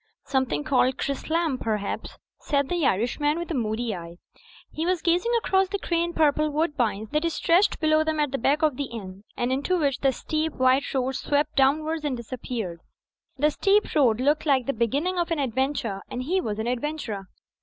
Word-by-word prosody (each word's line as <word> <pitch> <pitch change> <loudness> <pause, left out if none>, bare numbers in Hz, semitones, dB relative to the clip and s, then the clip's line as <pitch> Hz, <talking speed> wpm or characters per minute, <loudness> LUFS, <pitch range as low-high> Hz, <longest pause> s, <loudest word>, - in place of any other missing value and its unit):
"Something 265 +1 0
called 260 -3 +2
Chrislam 315 0 -1
perhaps," 210 -3 -3 0.2
said 280 -2 0
the 345 -5 +1
Irishman, 270 - +1
with 345 0 -4
a - - 0
moody 225 -3 -1
eye. 170 -1 -8 0.6
He 315 - -3
was 360 -1 0
gazing 355 +7 +2
across 385 -4 +2
the 400 +2 -2
grey 340 -3 0
and 345 0 -4
purple 305 0 +3
woodbinds 250 -9 -1
that 320 +2 +1
stretched 345 +5 +2
below 310 0 +3
them 315 -1 -1
at 295 -3 +1
the 275 - -2
back 290 +6 +2
of 300 -5 +2
the 285 - -1
inn; 200 -5 -9
and 240 +1 0
into 280 +8 +1
which 280 -5 0
the 270 - +3
steep, 310 +4 -2
white 260 +2 +2
road 260 0 +1
swept 290 +3 -1
downwards 305 +4 +2
and 280 -4 -1
disappeared. 230 -6 -5 0.6
The 300 +3 +3
steep 405 +6 +2
road 245 -7 +3
looked 295 +4 +1
like 265 -4 +3
the 275 - 0
beginning 285 - 0
of 345 - 0
an 330 - 0
adventure; 260 -6 -1
and 250 - -4
he 370 +7 0
was 210 -7 -3
an 220 - -2
adventurer. 240 -5 -3
280 Hz, 190 wpm, -25 LUFS, 245-315 Hz, 0.6 s, purple